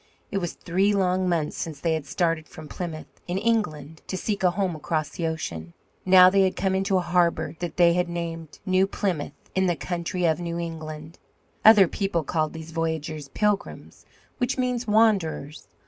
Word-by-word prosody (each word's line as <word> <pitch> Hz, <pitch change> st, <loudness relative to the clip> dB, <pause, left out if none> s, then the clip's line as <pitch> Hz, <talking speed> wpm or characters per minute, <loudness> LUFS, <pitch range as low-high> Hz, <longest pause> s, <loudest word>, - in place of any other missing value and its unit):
It 200 Hz, -, 0 dB
was 175 Hz, -3 st, -3 dB
three 195 Hz, +4 st, +1 dB
long 185 Hz, -1 st, +1 dB
months 160 Hz, -4 st, -1 dB
since 155 Hz, -4 st, -5 dB
they 165 Hz, +2 st, 0 dB
had 155 Hz, -3 st, -3 dB
started 165 Hz, +1 st, 0 dB
from 155 Hz, -1 st, -11 dB
Plymouth, 160 Hz, -1 st, -7 dB
in 180 Hz, +1 st, -2 dB
England, 160 Hz, -9 st, -1 dB
to 185 Hz, -, -3 dB
seek 205 Hz, +1 st, -2 dB
a 185 Hz, -, +4 dB
home 185 Hz, -1 st, -1 dB
across 155 Hz, -1 st, -2 dB
the 165 Hz, +3 st, -3 dB
ocean. 85 Hz, -, -5 dB, 0.3 s
Now 185 Hz, -1 st, +9 dB
they 195 Hz, +1 st, +4 dB
had 190 Hz, -1 st, +2 dB
come 190 Hz, -1 st, 0 dB
into 190 Hz, 0 st, +1 dB
a -, -, +2 dB
harbour 170 Hz, -2 st, +1 dB
that 175 Hz, -3 st, -5 dB
they 175 Hz, 0 st, +5 dB
named 170 Hz, -2 st, -6 dB
New 185 Hz, 0 st, +3 dB
Plymouth, 185 Hz, -7 st, -2 dB, 0.2 s
in 190 Hz, 0 st, +2 dB
the 175 Hz, -, +1 dB
country 175 Hz, +1 st, -3 dB
of 160 Hz, -1 st, +2 dB
New 170 Hz, -1 st, -4 dB
England. 160 Hz, -1 st, -7 dB, 0.4 s
Other 210 Hz, -4 st, +8 dB
people 185 Hz, -3 st, -1 dB
called 155 Hz, 0 st, -1 dB
these 160 Hz, 0 st, -8 dB
voyagers 160 Hz, -2 st, -3 dB
Pilgrims, 205 Hz, +7 st, -2 dB, 0.3 s
which 245 Hz, 0 st, 0 dB
means 250 Hz, -2 st, -1 dB
wanderers. 200 Hz, -9 st, +1 dB
175 Hz, 180 wpm, -25 LUFS, 160-190 Hz, 0.4 s, Now